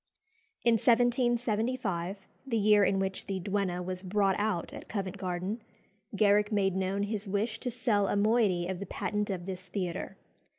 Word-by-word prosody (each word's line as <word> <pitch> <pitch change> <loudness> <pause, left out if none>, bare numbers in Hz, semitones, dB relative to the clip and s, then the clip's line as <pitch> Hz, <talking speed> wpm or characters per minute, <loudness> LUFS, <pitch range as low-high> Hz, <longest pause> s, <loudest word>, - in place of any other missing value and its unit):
In 230 -2 +4
1775, 235 -5 +1 0.2
the 230 -3 0
year 210 -1 +5
in 195 - +3
which 190 0 -2
"The 195 -2 -2
Duenna" 190 -2 -1
was 185 0 -4
brought 195 0 +2
out 205 -5 -1
at - - -9
Covent 195 -4 -3
Garden, 185 +5 -3 0.5
Garrick 210 +1 +4
made 195 -3 +2
known 190 +1 0
his 205 0 -3
wish 210 +3 -1
to 250 - -3
sell 225 -4 +1
a - - 0
moiety 205 -4 +3
of 185 0 -3
the 200 - -6
patent 210 +2 -2
of 180 -3 -3
this 185 -1 -5
theatre. 180 -2 -4
200 Hz, 165 wpm, -30 LUFS, 190-220 Hz, 0.5 s, year